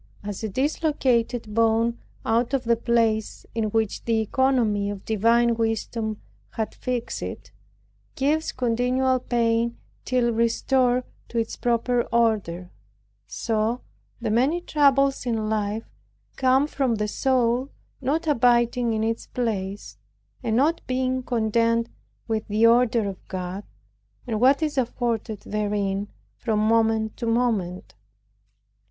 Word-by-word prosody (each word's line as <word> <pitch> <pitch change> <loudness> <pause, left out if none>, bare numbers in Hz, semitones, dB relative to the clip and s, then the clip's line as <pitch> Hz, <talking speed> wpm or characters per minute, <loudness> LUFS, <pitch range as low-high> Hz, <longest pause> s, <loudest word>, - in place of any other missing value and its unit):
As 205 +1 -5
a 220 - -1
dislocated 255 - 0
bone 230 +1 +2 0.3
out 235 +4 +1
of 260 - -1
the 235 -1 +3
place 225 -2 0
in 225 -1 0
which 220 0 -1
the 230 -1 +2
economy 220 -3 +1
of 200 -1 -6
divine 230 +2 +3
wisdom 225 -1 -2 0.3
had 220 -1 -3
fixed 250 -2 -3
it, - - -7 0.6
gives 300 +4 +1
continual 255 +1 +1
pain 235 -1 0 0.3
till 245 -2 +1
restored 245 +2 +2 0.3
to 235 - -5
its 225 -1 -1
proper 240 +1 +1
order, 205 -7 0 0.6
so 220 - -1 0.4
the 230 -3 -2
many 265 +10 +2
troubles 275 -5 +2
in 220 -2 -1
life 215 0 -1 0.5
come 265 +1 +3
from 270 -5 0
the 210 0 -1
soul 255 +2 +1 0.3
not 295 +6 0
abiding 240 -3 +3
in 220 0 0
its 225 +1 -2
place, 200 - -3 0.4
and 220 - -1
not 300 +7 +2
being 255 0 0
content 230 -1 +1 0.4
with 220 -1 -2
the 215 +2 +3
order 230 -2 +4
of 195 -2 -8
God, 185 +1 -5 0.6
and 225 -3 -2
what 275 +5 +5
is 300 -3 0
afforded 230 -3 -2
therein 205 -1 -1 0.3
from 220 -2 0
moment 220 0 +2
to 235 - -3
moment. 225 -7 0
230 Hz, 125 wpm, -24 LUFS, 220-250 Hz, 0.6 s, what